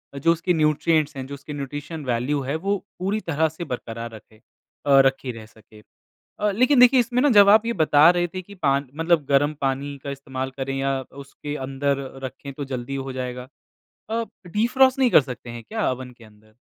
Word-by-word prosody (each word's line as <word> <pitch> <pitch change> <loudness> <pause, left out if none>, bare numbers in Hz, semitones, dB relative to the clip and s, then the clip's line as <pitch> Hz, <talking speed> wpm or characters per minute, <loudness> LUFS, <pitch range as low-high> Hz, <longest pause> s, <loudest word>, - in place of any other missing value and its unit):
जो 145 +4 +2
उसके 170 +2 0
न्यूट्रिएंट्स 155 -1 +1
हैं, 130 - -5
जो 140 - -8
उसकी 145 +2 -8
न्यूट्रिशन 145 +3 -6
वैल्यू 125 +4 0
है 135 +3 -3
वो 195 +5 -1 0.2
पूरी 195 +4 -1
तरह 160 +1 +2
से 160 +3 -8
बरकरार 115 -1 -5
रखे 110 0 -16 0.5
अ, 140 -1 +6
रखी 135 -1 0
रह 115 -2 -10
सके। 110 -1 -19 0.6
अ, 210 - +1
लेकिन 250 +6 +3
देखिए 250 +1 +7
इसमें 240 +1 0
ना 290 - +4
जब 200 0 +8
आप 215 +2 +6
ये 235 - 0
बता 150 +1 +6
रहे 175 0 +1
थे 185 - -4
कि 200 +3 -14
पान 140 0 +1
मतलब 165 -1 +1
गर्म 145 +2 +2
पानी 140 +1 -2
का 140 - -4
इस्तेमाल 135 -1 -5
करें 135 0 -3
या 135 0 0 0.3
उसके 145 +1 -7
अंदर 140 +1 -1 0.3
रखें 135 +2 -7
तो 145 +1 -6
जल्दी 125 +2 -5
हो 135 - -5
जाएगा। 125 0 -5 0.6
अ, 230 +1 0 0.2
डिफ्रॉस्ट 255 +8 +3
नहीं 255 -3 +3
कर - - +7
सकते 125 -3 -8
हैं 115 0 -8
क्या 220 -6 0
ओवन 125 0 -7
के 115 - -15
अंदर? 110 0 -21
140 Hz, 200 wpm, -23 LUFS, 130-175 Hz, 0.6 s, जब